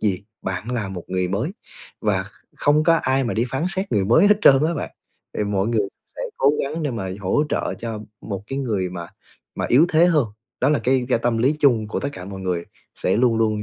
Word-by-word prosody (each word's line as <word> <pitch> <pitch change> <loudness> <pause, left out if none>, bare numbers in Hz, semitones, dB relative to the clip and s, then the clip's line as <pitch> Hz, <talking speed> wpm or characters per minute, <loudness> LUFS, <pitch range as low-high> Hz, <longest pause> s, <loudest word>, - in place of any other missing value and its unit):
gì, 100 -1 0 0.2
bạn 95 +4 -4
là 115 -5 -2
một 90 -3 -6
người 90 -1 -1
mới. 110 - -1 0.5
Và - - +1 0.3
không 150 +1 +3
có 165 - +5
ai 130 +1 +1
mà 120 - -2
đi 115 - +1
phán 135 +5 -1
xét 195 +1 -3
người 100 -4 +2
mới 120 - +5
hết 210 - +7
trơn 135 +2 +7
á 170 - -1
bạn. - - -4 0.5
Thì 105 - +1
mọi 100 +1 0
người 110 -4 +1 0.3
sẽ - - -4
cố 140 +2 +4
gắng 155 +4 -4
để 145 - 0
mà 100 -6 -4
hỗ 100 +10 +1
trợ - - -1
cho 115 -2 -5 0.2
một 100 -3 -5
cái 135 - -4
người 105 -9 -1
mà 85 -2 -6 0.5
mà - - -2
yếu 150 +8 +6
thế 165 +2 +6
hơn, 150 -8 +3 0.3
đó 130 - +3
là 150 - +3
cái 130 0 +2
ga 125 - +3
tâm 120 -1 0
lý 135 +6 +2
chung 120 -8 +3
của - - -2
tất 140 - -2
cả 90 - -8
mọi 95 0 -7
người, 90 -2 -2 0.3
sẽ 95 - 0
luôn 120 -1 +3
luôn 110 -2 +1
115 Hz, 240 wpm, -22 LUFS, 100-140 Hz, 0.5 s, hết